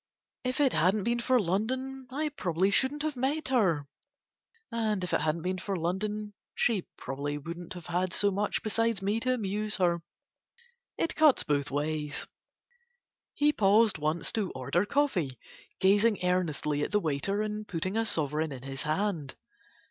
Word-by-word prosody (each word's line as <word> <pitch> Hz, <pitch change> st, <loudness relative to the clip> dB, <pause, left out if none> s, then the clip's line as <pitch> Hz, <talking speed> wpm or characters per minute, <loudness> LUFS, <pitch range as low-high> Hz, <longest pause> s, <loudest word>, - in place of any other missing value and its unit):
If 255 Hz, +1 st, -2 dB
it 280 Hz, -3 st, +4 dB
hadn't 185 Hz, +6 st, +3 dB
been 235 Hz, +2 st, +1 dB
for 250 Hz, +1 st, +3 dB
London 255 Hz, +8 st, -2 dB
I 300 Hz, +3 st, -1 dB
probably 190 Hz, -, 0 dB
shouldn't 275 Hz, +7 st, +2 dB
have 310 Hz, -2 st, -1 dB
met 270 Hz, +4 st, -1 dB
her, 180 Hz, -, +2 dB, 0.8 s
and 215 Hz, -4 st, 0 dB
if 180 Hz, -, -3 dB
it -, -, +2 dB
hadn't 160 Hz, +1 st, 0 dB
been 185 Hz, +1 st, -1 dB
for 195 Hz, +2 st, -3 dB
London 205 Hz, +5 st, -2 dB, 0.2 s
she 215 Hz, -7 st, +1 dB
probably 140 Hz, +2 st, -4 dB
wouldn't 170 Hz, +4 st, -7 dB
have 175 Hz, -3 st, -9 dB
had 180 Hz, +1 st, -1 dB
so 200 Hz, +3 st, +2 dB
much 205 Hz, +2 st, -1 dB
besides 225 Hz, -1 st, +1 dB
me 205 Hz, +3 st, +1 dB
to 255 Hz, +2 st, +1 dB
amuse 210 Hz, -1 st, -1 dB
her. 175 Hz, -3 st, +2 dB, 1.0 s
It 330 Hz, -, 0 dB
cuts 310 Hz, -3 st, +5 dB
both 145 Hz, -1 st, 0 dB
ways." 150 Hz, +1 st, -2 dB, 1.1 s
He 295 Hz, +1 st, +3 dB
paused 210 Hz, -, +4 dB
once 155 Hz, +3 st, 0 dB
to 210 Hz, -5 st, -1 dB
order 170 Hz, +10 st, 0 dB
coffee, 190 Hz, -, 0 dB, 0.4 s
gazing 205 Hz, +3 st, +4 dB
earnestly 155 Hz, -5 st, 0 dB
at -, -, -1 dB
the 210 Hz, -, +2 dB
waiter 195 Hz, +5 st, -1 dB
and 215 Hz, 0 st, -4 dB
putting 185 Hz, +2 st, -3 dB
a 225 Hz, -, +2 dB
sovereign 155 Hz, -5 st, +1 dB
in 130 Hz, -2 st, -8 dB
his 135 Hz, 0 st, -5 dB
hand. 155 Hz, -2 st, -1 dB
195 Hz, 160 wpm, -29 LUFS, 160-230 Hz, 1.1 s, cuts